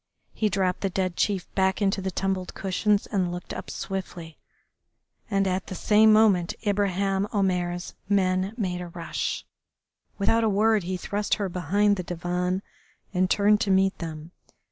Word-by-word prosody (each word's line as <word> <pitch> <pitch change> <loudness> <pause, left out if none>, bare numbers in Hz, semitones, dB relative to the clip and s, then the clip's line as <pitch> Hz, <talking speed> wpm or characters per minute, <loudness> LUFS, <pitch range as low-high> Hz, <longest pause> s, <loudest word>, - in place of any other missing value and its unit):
He 215 - 0
dropped 190 -2 0
the 195 - 0
dead 185 -1 -1
chief 195 -4 0
back 190 -1 +1
into 195 -1 +1
the 190 - -2
tumbled 190 0 -2
cushions 200 +2 +1
and 185 -4 -1
looked 175 0 -6
up - - -7
swiftly, 175 -4 -6 0.9
and 195 -2 +1
at 185 0 -1
the 185 - -6
same 215 +3 +5
moment 210 -6 +4
Ibraheim 200 -1 +1
Omair's 180 -3 -1 0.2
men 190 0 +1
made 180 -5 -2
a 175 - -6
rush. 170 0 -4 0.7
Without 225 +3 +2
a 220 - +3
word 215 +1 +3
he 185 +1 -2
thrust 205 +3 -1
her 200 -3 -2
behind 200 +4 +1
the 180 - -3
divan 180 +2 -2 0.5
and 185 0 +2
turned 210 +1 +4
to 205 - 0
meet 190 0 +3
them. 160 -1 -7
190 Hz, 160 wpm, -26 LUFS, 180-205 Hz, 0.9 s, same